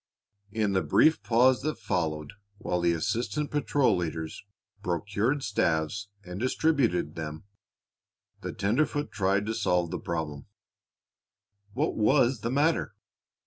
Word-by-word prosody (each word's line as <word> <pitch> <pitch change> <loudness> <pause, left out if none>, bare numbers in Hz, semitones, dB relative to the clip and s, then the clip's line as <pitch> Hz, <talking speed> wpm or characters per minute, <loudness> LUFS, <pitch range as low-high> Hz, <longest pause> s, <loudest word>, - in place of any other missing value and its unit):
In 105 -2 0
the 95 - +2
brief 110 - +4
pause 120 +4 +4
that 155 +2 -2
followed 80 -8 -2 0.2
while 90 -3 -2
the 85 0 +3
assistant 120 - -1
patrol 145 -5 +2
leaders 80 -2 -4 0.4
procured 105 - -1
staves 100 - 0 0.2
and 90 +1 -6
distributed 130 - +1
them, 80 -1 -6 1.0
the - - -4
tenderfoot 145 +8 0
tried 100 0 +1
to 110 - -1
solve 90 -6 +1
the - - -3
problem. 80 -3 -4 1.3
What 145 +7 0
was 120 +3 +3
the 115 - -2
matter? 145 +6 +1
105 Hz, 120 wpm, -28 LUFS, 85-130 Hz, 1.3 s, brief